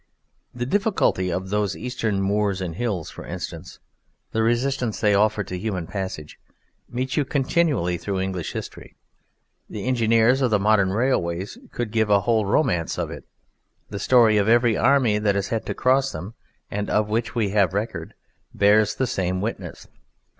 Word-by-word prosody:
The 120 0 -2
difficulty 190 - +1
of 95 +2 -3
those 105 -2 0
Eastern 110 -5 -2
moors 100 -1 0
and 90 -3 -4
hills, 100 -4 -3
for - - -10
instance, - - -7 0.5
the 110 - 0
resistance 120 0 0
they 105 -2 +3
offer 105 +1 +2
to 95 - -6
human 95 -4 -3
passage, 95 -6 -6 0.5
meets 130 +4 -3
you 150 - +3
continually 135 - 0
throughout 95 +1 -2
English 95 -3 -4
history. - - -8 0.7
The 105 0 -6
engineers 115 +1 +3
of 130 - +3
the 105 - +3
modern 100 -1 +3
railways 95 -5 -1
could 120 -3 -4
give 110 -1 +1
one 100 - +6
a - - -1
whole 110 0 +1
romance 90 - +1
of - - -3
it; - - -9 0.7
the 100 - -4
story 115 -1 +5
of 105 +1 +2
every 120 -1 +4
army 125 -6 +3
that 105 -1 +1
has 100 -1 -1
had 115 -1 -2
to - - -3
cross 135 +1 +2
them, 95 +8 -7 0.4
and 105 0 -3
of 105 0 +1
which 115 +3 -1
we 110 -4 +1
have 95 -2 +2
record, 110 +3 -4 0.4
bears 105 +1 +4
the 130 - 0
same 95 -5 -1
witness. 110 +4 -5
105 Hz, 170 wpm, -23 LUFS, 95-120 Hz, 0.7 s, one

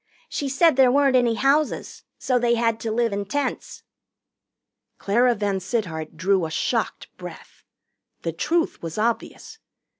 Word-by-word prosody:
She 280 - -3
said 280 +2 +3
there 260 -2 +6
weren't 275 -1 +3
any 240 -2 +3
houses, 280 +5 0
so 255 -2 0
they 235 0 +2
had 230 -1 0
to 225 - -3
live 230 -1 0
in 200 0 -2
tents." 260 +6 -4 1.1
Clara 240 +4 +2
VanSittart 195 -5 -3
drew 185 -1 +1
a - - -9
shocked 155 - -2
breath. - - -11 0.6
The 165 - -2
truth 330 - -1
was 165 +1 -6
obvious. 235 - -3
235 Hz, 140 wpm, -23 LUFS, 200-265 Hz, 1.1 s, there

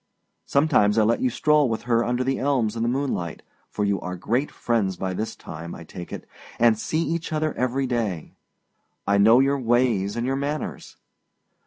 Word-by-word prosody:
Sometimes 130 -8 +3
I 110 - +5
let 115 +2 +2
you 130 - +2
stroll 150 +2 +3
with 110 - -3
her 120 -1 +2
under 125 +2 0
the 135 +1 -1
elms 125 -6 +1
in 115 - -3
the 115 - +1
moonlight, 125 - -2 0.3
for 105 - -2
you 100 -2 0
are 90 0 -4
great 120 +10 -1
friends 105 -6 -1
by 95 -1 -3
this 110 +4 -4
time, 85 +2 -8
I 85 - -10
take 85 +1 -9
it, - - -7 0.3
and 115 -1 +5
see 160 +7 -1
each 170 0 -3
other 155 0 0
every 130 +2 -1
day. 110 -10 -2 0.7
I 100 0 +2
know 110 +4 +6
your 140 +1 +2
ways 120 -5 +1
and 120 0 -2
your 135 +1 0
manners! 145 +2 -4
120 Hz, 190 wpm, -24 LUFS, 100-135 Hz, 0.7 s, know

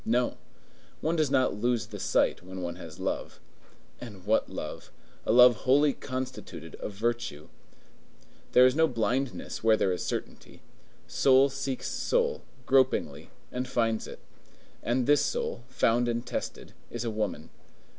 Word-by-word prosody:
No. 120 +2 +1 0.7
One 160 +2 0
does 155 -4 +2
not 130 -1 +2
lose 115 +2 0
the - - -9
sight - - +1
when 95 0 -8
one 85 -1 -4
has - - -10
love. - - -3 0.6
And 105 -6 -10
what 110 +2 +2
love! - - -7 0.4
A - - +3
love 125 0 +7
wholly 140 +4 +3
constituted 130 - -6
of 105 - -5
virtue! 115 -8 -3 1.0
There 125 - +8
is 130 +1 +4
no 160 +1 +4
blindness 120 -2 -2
where 110 -1 +5
there 95 - +1
is 90 - -4
certainty. - - -6 0.4
Soul 135 +1 +4
seeks 135 -1 -4
soul, 475 -1 0 0.2
gropingly, 130 0 +2 0.2
and 125 +1 -3
finds 115 -2 0
it. - - -9 0.6
And 120 +1 0
this 145 +1 +4
soul, 120 - -2
found 120 -1 +2
and 120 0 -1
tested, - - -5 0.2
is 120 0 -4
a 115 - -2
woman. 105 -7 -3
120 Hz, 145 wpm, -28 LUFS, 110-130 Hz, 1.0 s, There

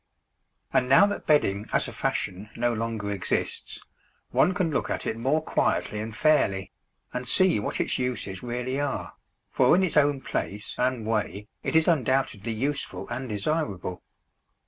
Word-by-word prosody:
And 125 0 +2
now 135 +9 +8
that 205 - -4
bedding 105 -9 +2
as - - +2
a - - -7
fashion 95 +4 -2
no 120 0 +1
longer 110 -2 -3
exists, 95 -3 -2 0.5
one 185 - +3
can 180 -4 +1
look 140 - -1
at - - -2
it - - -1
more 135 +7 +1
quietly 105 - 0
and 110 0 -5
fairly, 100 - +2 0.4
and 125 0 -4
see 185 - +4
what 105 - -3
its - - 0
uses 120 -7 -3
really 125 +2 -3
are, 145 -1 -2 0.4
for - - +5
in 190 - +3
its 180 - 0
own 145 -1 +4
place 105 -4 -3
and 125 -3 0
way 105 -2 -2
it - - -2
is 160 0 +5
undoubtedly 130 - +1
useful 135 +6 -3
and 130 +1 -4
desirable. 105 - -2
125 Hz, 160 wpm, -26 LUFS, 105-145 Hz, 0.5 s, now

